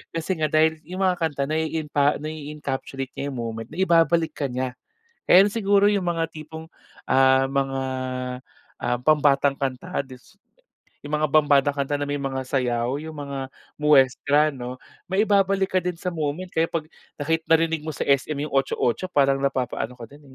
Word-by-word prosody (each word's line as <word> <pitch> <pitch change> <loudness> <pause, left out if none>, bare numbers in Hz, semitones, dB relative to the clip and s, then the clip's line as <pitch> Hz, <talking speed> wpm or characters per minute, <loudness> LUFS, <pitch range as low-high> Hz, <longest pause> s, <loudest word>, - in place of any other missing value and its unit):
Kasi 165 +3 -2
nga 155 - +2
dahil 155 +1 +2
yung 185 +2 -3
mga 185 -1 +2
kanta 150 -4 -1
naiinpa 155 -2 0
nai-encapsulate 145 -3 -5
niya 140 - -3
yung - - -7
moment, 115 -1 -5
naibabalik 165 0 +2
ka 140 - -3
niya. 125 0 -4 0.5
Kaya 190 +3 +7
siguro 205 -1 +3
yung 200 -3 0
mga 170 -1 0
tipong, 160 +1 -10 0.4
ah, 130 0 +4
mga, 135 -1 -1 1.0
ah, 120 - -1
pambatang 140 -1 +3
kanta 140 +3 -3
dis 130 +10 -15 0.6
yung 145 +1 -3
mga 150 -2 -1
pambatang 145 -2 +4
kanta 140 0 -1
na 145 - -2
may 145 0 -3
mga 135 -1 -3
sayaw 125 0 -1
yung 160 0 -8
mga 140 -2 -5 0.3
muestra 145 +1 +4
'no. 125 -1 -6 0.3
Maibabalik 195 0 +2
ka 185 - +3
din 180 -1 -3
sa 180 +1 -4
moment 155 +2 -2
kaya 165 +1 +1
'pag 165 -2 -3 0.3
nakit 160 +2 0
narinig 165 0 +3
mo 155 - -9
sa 155 - -3
SM 140 +2 +1
yung 145 +2 -4
Otso-Otso 135 +4 0
parang 140 -5 +2
napapaano 125 -3 -2
ka 120 - -9
din, 145 +5 -15
145 Hz, 160 wpm, -24 LUFS, 135-165 Hz, 1.0 s, Kaya